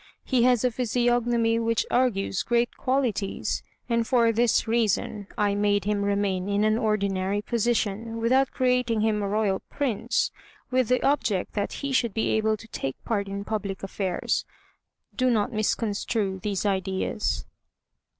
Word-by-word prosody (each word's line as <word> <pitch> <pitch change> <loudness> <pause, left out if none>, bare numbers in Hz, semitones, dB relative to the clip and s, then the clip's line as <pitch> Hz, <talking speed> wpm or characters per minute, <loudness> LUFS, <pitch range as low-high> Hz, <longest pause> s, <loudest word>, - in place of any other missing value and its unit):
He 255 -3 +1
has 250 -2 +4
a 250 - +2
physiognomy 240 -1 +1
which 230 0 +1
argues 210 -7 +1
great 240 0 +1
qualities, 250 -7 -1 0.3
and 230 -1 +1
for 235 -3 +4
this 230 0 +2
reason, 215 -2 0
I 205 -1 +2
made 205 0 +1
him 210 -1 0
remain 200 -2 0
in 205 +1 +1
an 215 +1 +2
ordinary 200 -2 0
position, 230 -1 -1
without 260 +4 +3
creating 250 -3 +1
him 215 -1 +1
a 200 - -1
Royal 205 -1 +1
Prince, 260 -8 0 0.4
with 255 -2 +2
the 250 +1 +1
object 235 -9 +1
that 205 -1 -1
he 280 - -2
should 235 -5 +1
be 220 - +1
able 220 0 +1
to 225 - -13
take 135 -8 -4
part 200 -3 -1
in 200 0 -4
public 200 -3 -3
affairs. 190 -2 -1 0.7
Do 255 -1 +2
not 220 -3 +1
misconstrue 210 -2 -1
these 205 0 -2
ideas." 190 +1 -1
220 Hz, 150 wpm, -26 LUFS, 200-240 Hz, 0.7 s, has